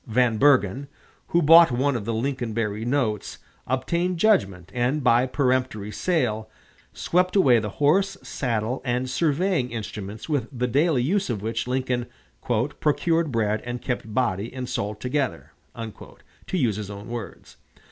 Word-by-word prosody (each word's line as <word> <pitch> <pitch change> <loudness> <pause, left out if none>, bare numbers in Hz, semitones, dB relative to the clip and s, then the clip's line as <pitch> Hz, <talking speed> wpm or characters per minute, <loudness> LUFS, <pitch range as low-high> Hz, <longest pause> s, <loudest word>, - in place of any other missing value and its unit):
Van 115 -1 +2
Bergen, 135 -2 +3 0.4
who 170 0 +2
bought 165 +3 +8
one 130 +3 +1
of 110 -4 -3
the 115 - -1
Lincoln 120 -1 -2
Berry 105 -1 -2
notes, 120 -5 -1 0.3
obtained 170 +8 0
judgment, 100 - +1
and, 130 +4 0
by 125 +1 +4
peremptory 125 -6 0
sale, 110 -10 -1 0.4
swept 180 +2 0
away 130 - +5
the 105 -1 -4
horse, 185 +7 +2
saddle, 120 -1 -2
and 125 0 -1
surveying 155 +1 0
instruments 105 -2 -6
with 145 -7 -1
the 125 -2 -2
daily 140 +1 +2
use 190 +6 0
of 105 -4 -3
which 115 +2 -2
Lincoln 125 -1 -1 0.7
"procured 165 +1 +1
bread 110 -2 0
and 120 0 -4
kept 120 -4 -4
body 105 -2 -1
and 130 -1 -5
soul 105 -4 -3
together," 125 +3 -2 0.2
to 115 - -8
use 115 - +1
his 105 -2 -5
own 100 0 -8
words. 120 -3 -8
125 Hz, 145 wpm, -24 LUFS, 110-145 Hz, 0.7 s, bought